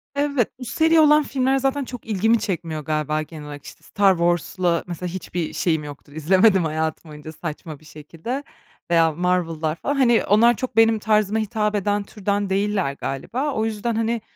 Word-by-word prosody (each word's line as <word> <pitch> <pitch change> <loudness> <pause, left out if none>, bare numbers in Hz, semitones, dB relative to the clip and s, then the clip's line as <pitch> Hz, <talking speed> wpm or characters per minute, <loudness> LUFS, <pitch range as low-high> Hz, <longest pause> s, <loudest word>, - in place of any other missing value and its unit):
Evet, 280 -5 +1
bu 250 - -7
seri 320 +7 +3
olan 300 0 +6
filmler 265 -1 0
zaten 270 +1 0
çok 245 -2 -9
ilgimi 220 +2 +2
çekmiyor 165 -6 -3
galiba 155 0 -1
genel 155 -1 -9
olarak. 145 -1 -9
İşte, - - -13
Star 200 -1 +3
Wars'la 175 0 0
mesela 180 +1 -5
hiçbir 175 -2 -4
şeyim 160 -3 0
yoktur. 145 -1 -11
İzlemedim 185 +5 +3
hayatım 160 +1 -3
boyunca 150 +1 -9
saçma 155 -1 -7
bir 155 - -21
şekilde. 165 - -6 0.5
Veya 165 -1 +4
Marvel'lar 165 -2 -1
falan, 285 +12 -2
hani, 240 -4 +3
onlar 230 +4 +5
çok 255 -2 -5
benim 225 -1 +4
tarzıma 215 0 +1
hitap 215 -1 -1
eden 205 0 0
türden 200 0 -2
değiller 195 -5 0
galiba. 250 - -3
O 220 - 0
yüzden, 225 +1 -2
hani, 230 +1 -1
195 Hz, 170 wpm, -22 LUFS, 160-230 Hz, 0.5 s, olan